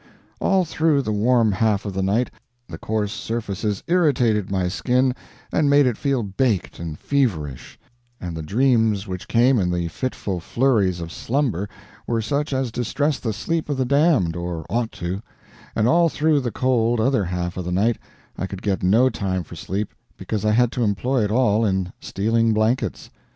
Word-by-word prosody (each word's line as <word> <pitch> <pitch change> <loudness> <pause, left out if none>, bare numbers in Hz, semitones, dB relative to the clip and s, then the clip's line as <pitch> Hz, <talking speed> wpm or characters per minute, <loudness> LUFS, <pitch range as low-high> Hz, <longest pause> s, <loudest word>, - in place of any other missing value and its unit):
All 190 -2 +2
through 160 -3 +1
the 110 - -2
warm 115 +1 +3
half 105 +1 +1
of 100 - -4
the 95 - -1
night 105 +6 +1 0.4
the - - -8
coarse 105 -2 -1
surfaces 105 -3 -3
irritated 125 - +2
my 95 -2 0
skin 125 +7 +1 0.4
and 150 -2 +3
made 145 0 +5
it 125 -3 +1
feel 135 -2 0
baked 100 0 -1
and 80 -2 -5
feverish, 90 - -1 0.4
and 85 -2 -5
the 80 - -4
dreams 110 - +2
which 90 -1 -6
came 120 +1 +4
in 90 -2 +1
the 85 -1 -1
fitful 100 -1 -3
flurries 100 -4 +1
of 85 0 -6
slumber 115 - -1 0.4
were 115 -1 0
such 140 +7 -1
as 130 -3 -1
distress 140 +5 -1
the 115 - -2
sleep 160 +11 -2
of 145 - -1
the 130 - +1
damned, 140 - +3
or 85 -2 -4
ought 115 -1 0
to; 90 +3 -4 0.5
and 110 0 +2
all 170 +4 +4
through 155 0 +2
the 125 -3 -2
cold 120 -1 +1
other 125 -2 +2
half 90 0 -3
of 90 - -4
the 90 - -4
night 105 +6 +1 0.4
I 95 - -2
could 95 0 -8
get 100 -3 0
no 110 +8 +4
time 95 -2 -2
for - - -11
sleep 100 +3 -4 0.2
because 110 -2 -3
I 105 - +3
had 120 +1 +3
to 125 - -1
employ 115 +4 +1
it - - -2
all 115 -2 +3
in 95 -3 0
stealing 115 +3 +1
blankets. 110 -1 0
110 Hz, 180 wpm, -22 LUFS, 95-130 Hz, 0.5 s, made